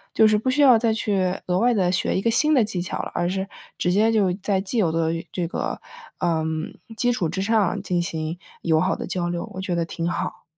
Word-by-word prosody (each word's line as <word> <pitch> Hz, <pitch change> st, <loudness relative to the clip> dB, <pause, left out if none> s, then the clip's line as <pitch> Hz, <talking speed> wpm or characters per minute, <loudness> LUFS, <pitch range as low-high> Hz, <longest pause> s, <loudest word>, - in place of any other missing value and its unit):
就 220 Hz, -, +6 dB
是 215 Hz, -, +3 dB
不 260 Hz, +4 st, -1 dB
需 290 Hz, +3 st, +2 dB
要 250 Hz, -5 st, +7 dB
再 230 Hz, -1 st, +2 dB
去 195 Hz, -4 st, 0 dB
额 180 Hz, 0 st, +1 dB
外 240 Hz, +1 st, +3 dB
地 180 Hz, -3 st, +2 dB
学 185 Hz, -, 0 dB
一 -, -, 0 dB
个 230 Hz, -, +2 dB
新 300 Hz, +6 st, +3 dB
的 250 Hz, -, +5 dB
技 200 Hz, -4 st, -3 dB
巧 175 Hz, -, -4 dB
了， -, -, -6 dB
而 175 Hz, 0 st, 0 dB
是 190 Hz, +1 st, -2 dB, 0.3 s
直 180 Hz, -, +1 dB
接 215 Hz, +4 st, +3 dB
就 200 Hz, -5 st, +2 dB
在 195 Hz, +1 st, -1 dB
既 205 Hz, +5 st, -2 dB
有 170 Hz, -6 st, +2 dB
的 165 Hz, 0 st, 0 dB, 0.2 s
这 175 Hz, -2 st, -2 dB
个， -, -, -3 dB, 0.4 s
呃， 160 Hz, -2 st, 0 dB, 0.5 s
基 245 Hz, 0 st, +2 dB
础 185 Hz, -10 st, -1 dB
之 190 Hz, +3 st, -2 dB
上 210 Hz, -4 st, +1 dB
进 175 Hz, -1 st, 0 dB
行 160 Hz, 0 st, -3 dB, 0.2 s
友 160 Hz, -2 st, +3 dB
好 -, -, +1 dB
的 -, -, -5 dB
交 175 Hz, -1 st, -2 dB
流， 175 Hz, 0 st, -3 dB
我 190 Hz, -, -5 dB
觉 185 Hz, -2 st, -2 dB
得 170 Hz, -1 st, 0 dB
挺 170 Hz, 0 st, -3 dB
好。 175 Hz, -, -4 dB
190 Hz, 260 characters per minute, -23 LUFS, 175-220 Hz, 0.5 s, 要